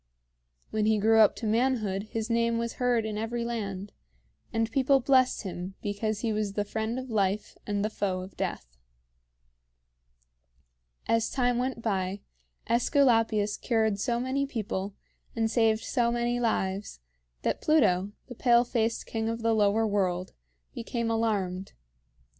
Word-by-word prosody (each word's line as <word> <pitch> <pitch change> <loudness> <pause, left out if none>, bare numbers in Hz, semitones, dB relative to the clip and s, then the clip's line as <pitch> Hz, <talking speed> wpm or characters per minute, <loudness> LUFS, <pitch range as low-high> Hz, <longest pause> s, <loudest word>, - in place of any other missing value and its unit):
When 215 -1 +1
he 220 0 +3
grew 220 +2 +4
up 215 -2 +6
to 230 - -6
manhood 220 -3 0
his 225 -1 -3
name 230 0 +1
was 235 0 -3
heard 245 -3 +2
in 215 -1 -3
every 235 +1 -2
land, 205 -4 -4 0.6
and 225 0 0
people 270 +2 +3
blessed 260 -1 +3
him 185 0 -6
because 210 +1 -2
he 225 -2 0
was 210 -2 -1
the 205 0 -1
friend 220 +3 -3
of 260 -1 -6
life 200 -1 0
and 205 0 0
the - - 0
foe 190 -3 -1
of 185 +1 -10
death. - - -4 2.3
As 230 -1 +2
time 245 -2 +1
went 250 -2 -2
by, 195 -2 -1 0.5
AEsculapius 225 -4 +2
cured 220 -4 +1
so 235 +2 0
many 265 +3 -1
people 200 -5 -4 0.4
and 225 -1 0
saved 225 -2 +2
so 240 -3 +1
many 240 0 0
lives 200 - -1 0.4
that - - -1
Pluto, 200 - +3
the 250 - -9
pale 240 0 +4
faced 230 -2 -1
king 225 0 -2
of 230 0 -4
the 230 0 +3
Lower 215 +1 +3
World, 185 -3 -1 0.4
became 235 0 -3
alarmed. 200 -5 -1
225 Hz, 145 wpm, -28 LUFS, 205-235 Hz, 2.3 s, up